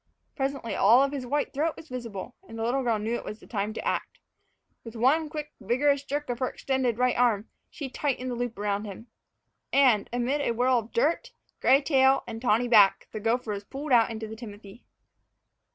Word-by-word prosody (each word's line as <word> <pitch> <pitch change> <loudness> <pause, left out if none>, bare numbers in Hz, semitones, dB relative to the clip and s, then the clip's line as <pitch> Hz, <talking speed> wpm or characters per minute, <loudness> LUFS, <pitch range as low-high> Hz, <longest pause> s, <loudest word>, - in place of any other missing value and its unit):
Presently 270 -4 -2
all 235 +7 +5
of 275 - 0
his 270 -3 -5
white 290 +3 -1
throat 310 +3 0
was 320 - -11
visible, 240 -3 -6 0.2
and 225 - -8
the 225 - -3
little 250 +4 +1
girl 235 -3 +1
knew 215 +2 -3
that 240 - 0
it - - -10
was 210 - -7
time 210 -1 -3
to - - -5
act. - - -2 0.7
With 230 0 -10
one 290 +7 +2
quick, 300 -1 -6
vigorous 280 +5 +2
jerk 290 +1 -3
of 240 - -5
her 255 - 0
extended 260 -4 -1
right 250 0 +2
arm, 230 -4 +2 0.2
she 285 - -6
tightened 255 -1 -2
the - - -3
loop 240 -2 -3
around 205 0 -1
him. 215 +4 -9 0.6
And, 255 -7 +4
amid 245 +4 0
a 235 - 0
whirl 250 +1 +3
of 230 0 -10
dirt, 330 - 0 0.3
gray 270 +3 +4
tail, 270 -2 +4
and 225 0 -7
tawny 240 0 +2
back, 210 -5 +5
the 215 - -5
gopher 225 +1 0
was 200 0 -4
pulled 275 +6 -7
out 235 -2 +5
into 220 -1 -5
the 220 - -8
timothy. 210 -1 -11
245 Hz, 205 wpm, -27 LUFS, 225-275 Hz, 0.7 s, all